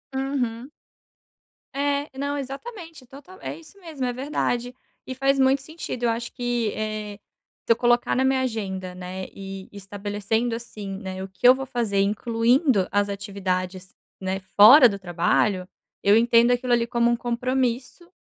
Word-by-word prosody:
Uhum. 265 -1 -2 1.0
É. 285 +1 -1
Não, 285 +1 -2
exatamente, 320 - -8
total. 285 +9 -14
É - - -5
isso 330 +5 -15
mesmo, 310 -7 -5
é 245 - -1
verdade 250 -2 -2 0.3
e 260 - -4
faz 275 +1 +1
muito 265 +1 +3
sentido 280 -4 -7
eu 235 - +3
acho 230 +1 -3
que, 240 -3 -1
eh, 215 -1 -4 0.5
se - - +1
eu 230 - +5
colocar 240 0 +2
na 260 - +2
minha 265 0 +2
agenda, 190 -7 -3
né, 185 +1 -6
e 195 -1 -8
estabelecendo, 205 +3 -3
assim, 210 -4 -6
né, 190 -1 -6
o 190 - -8
que 215 - +2
eu 255 - +9
vou 270 0 -5
fazer 220 -6 0
incluindo 230 - +2
as 205 0 +2
atividades, 190 -2 -4 0.2
né, 190 0 -3
fora 225 +8 +8
do 200 -1 -5
trabalho, 185 +2 +1 0.4
eu 205 +2 +6
entendo 235 +1 +4
aquilo 245 0 +1
ali 235 -1 +3
como 235 0 +1
um 240 - +2
compromisso, 255 +6 -2
235 Hz, 160 wpm, -24 LUFS, 200-265 Hz, 1.0 s, eu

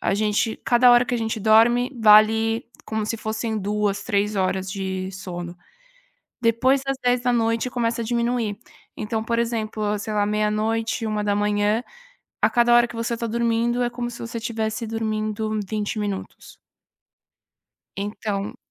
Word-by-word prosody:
a - - 0
gente 210 +1 0
cada 245 0 +5
hora 240 0 +6
que 250 - -2
a 240 - 0
gente 225 0 -2
dorme 230 +4 +4
vale 220 +2 +5 0.2
como 220 -1 -3
se 230 - -2
fossem 220 0 -3
2, 205 0 -1
3 205 -2 0
horas 190 0 -1
de 190 -1 -3
sono. 175 -2 -7 0.8
Depois 250 +4 +3
das 270 0 -1
22h, 245 -1 +1
começa 235 -1 -1
a - - -4
diminuir. 235 -2 -1 0.4
Então, 220 +1 -2
por 230 0 -1
exemplo, 215 -3 -1
sei 215 +1 -5
lá, 205 -1 +2
meia-noite, 215 +2 0
1h, 210 +1 +1 0.6
a - - +6
cada 240 -1 +4
hora 240 0 +5
que - - -11
você 230 +1 -2
tá 235 - -3
dormindo, 235 +1 0
é 240 - 0
como 240 0 -4
se 235 - -10
você 230 0 -5
tivesse 220 -1 -3
dormindo 215 -1 -2
20 215 0 -2
minutos. 205 -2 -5 1.4
Então 200 0 -4
220 Hz, 150 wpm, -23 LUFS, 210-235 Hz, 1.4 s, hora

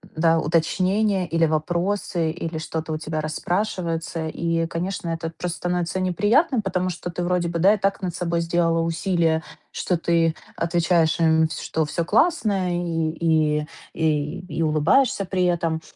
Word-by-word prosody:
да, 165 +1 +3
уточнения 185 +5 +1
или 165 -1 +2
вопросы, 170 +2 -1
или 165 -1 -5
что-то 160 0 -4
у - - -1
тебя 155 0 -4
расспрашивается. 165 0 -2
И, 165 +1 -1
конечно, 175 +1 -3
это 165 0 -3
просто 180 -1 -3
становится 175 0 -1
неприятным, 215 - +2
потому 185 -2 -1
что 175 0 -5
ты 175 - -4
вроде 175 -1 0
бы, 170 0 -2
да, 195 +5 +6
и - - 0
так 195 0 0
над 180 -3 -3
собой 170 -1 -1
сделала 165 0 +1
усилие, 165 -1 +1 0.3
что 180 - -1
ты 165 -1 +2 0.2
отвечаешь 170 -1 +1
им, 160 -1 +4
что 160 0 -2
всё 165 +3 -2
классно 205 - +2
и 170 -2 -1
и 155 -2 +1 0.3
и 155 +1 0 0.2
и - - +2
улыбаешься 170 - +2
при 185 0 0
этом. 165 -2 0
170 Hz, 155 wpm, -23 LUFS, 160-180 Hz, 0.3 s, да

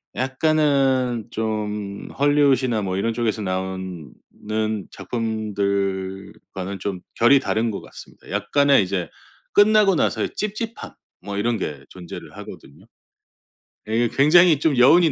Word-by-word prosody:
약간은 130 -3 +1
좀 105 -2 -4
할리우드 145 -2 +3
이나 115 -4 0
뭐 95 -1 -2
이런 115 +3 0
쪽에서 110 -2 -1
나오는 95 -5 -4 0.8
작품들과는 100 -4 -3
좀 90 -2 -4
결이 125 +4 +5
다른 115 -3 -1
것 100 - -6
같습니다. - - -14
약간의 135 +5 +3
이제 95 -1 -3 0.4
끝나고 205 -2 +5
나서의 - - 0
찝찝함. 215 +2 -4 0.3
뭐 100 +1 -6
이런 115 +3 0
게 75 -8 -5
존재를 90 -2 -10
하거든요. 70 - -12 1.0
예 115 +2 +1
굉장히 155 +4 +5
좀 150 -3 +1
여운이 165 +6 +6
110 Hz, 265 characters per minute, -22 LUFS, 100-140 Hz, 1.0 s, 여운이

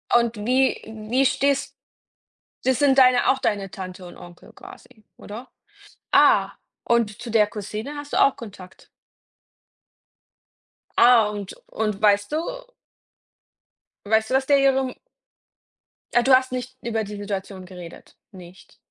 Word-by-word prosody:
Und 235 -1 +2
wie 260 +2 +1 0.3
wie 260 +3 +2
stehst 280 +1 0 0.9
das 260 -1 +1
sind 275 -2 +3
deine 255 -1 +5
auch 265 - +2
deine 200 -5 -2
Tante 185 -1 -8
und 175 - -12
Onkel 175 0 -15
quasi, 220 -4 -15
oder? 225 +5 -10 0.6
Ah, - - +4 0.3
und 235 -3 0
zu 240 - -7
der 215 -2 +4
Cousine 215 +6 -7
hast 290 0 -7
du - - 0
auch 275 - +4
Kontakt? 195 -5 -13 2.1
Ah, 235 -3 +5
und 205 -2 -7
und 210 -2 -3
weißt 205 +1 +2
du - - +1 1.7
weißt 220 +1 +1
du, - - -3
was 265 - +1
der 285 +1 +4
ihrem 265 -1 +1 1.2
Ah, 240 - +5
du 260 +2 +3
hast 260 0 0
nicht 255 +1 -6
über 225 -2 -2
die 210 0 -8
Situation 195 -2 -6
geredet, 180 -2 -12 0.2
nicht. 180 -1 -15
225 Hz, 135 wpm, -23 LUFS, 205-260 Hz, 2.1 s, deine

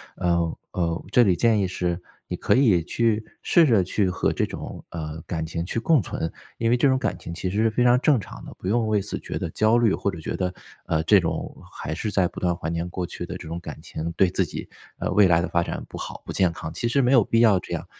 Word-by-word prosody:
呃， 85 -2 0
呃， 85 -1 -2
这 125 - +6
里 95 -5 +3
建 110 +4 +3
议 95 - +1
是 90 -1 -2 0.3
你 - - -3
可 - - +2
以 115 -10 +4
去 110 +5 0 0.2
试 170 - +5
着 110 -7 +4
去 95 +1 +1
和 90 - 0
这 - - 0
种， - - -8
呃， 80 -1 -6
感 80 -2 -2
情 85 +1 -4
去 115 +5 -2
共 155 0 +4
存， 80 -3 -4 0.3
因 115 0 +2
为 125 - +4
这 135 - +4
种 130 -1 +3
感 95 -9 -2
情 85 - -7
其 90 +2 -3
实 100 - -3
是 110 +1 +3
非 115 +3 +1
常 125 0 +5
正 140 +1 +4
常 105 - -8
的， - - -9
不 - - -12
用 115 +1 +1
为 105 -2 +2
此 105 - -4
觉 - - -5
得 - - -3
焦 110 +2 +3
虑 115 -4 +3
或 - - -1
者 90 - -5
觉 - - -4
得， 90 -1 -1 0.3
呃， 80 -1 0
这 100 +5 +6
种 85 -3 -3 0.2
还 80 - -5
是 105 +7 -3
在 95 -3 +2
不 - - -8
断 90 -1 +1
怀 85 -2 -4
念 85 +1 -2
过 90 0 -3
去 90 - -6
的 90 - -6
这 85 -3 -8
种 85 +1 -4
感 75 -3 -9
情， 85 0 -5
对 95 +1 +3
自 95 +1 +1
己， - - -7 0.3
呃， - - -2
未 105 -2 +6
来 85 -1 +4
的 90 - -2
发 85 - +2
展 - - -4
不 - - -8
好、 - - -7
不 - - -6
健 90 -3 +2
康， 80 -1 -7
其 120 - -2
实 135 +4 +2
没 125 0 +2
有 130 -4 +7
必 115 - +2
要 105 -5 +5
这 - - -8
样。 - - -3
95 Hz, 295 characters per minute, -24 LUFS, 85-115 Hz, 0.3 s, 有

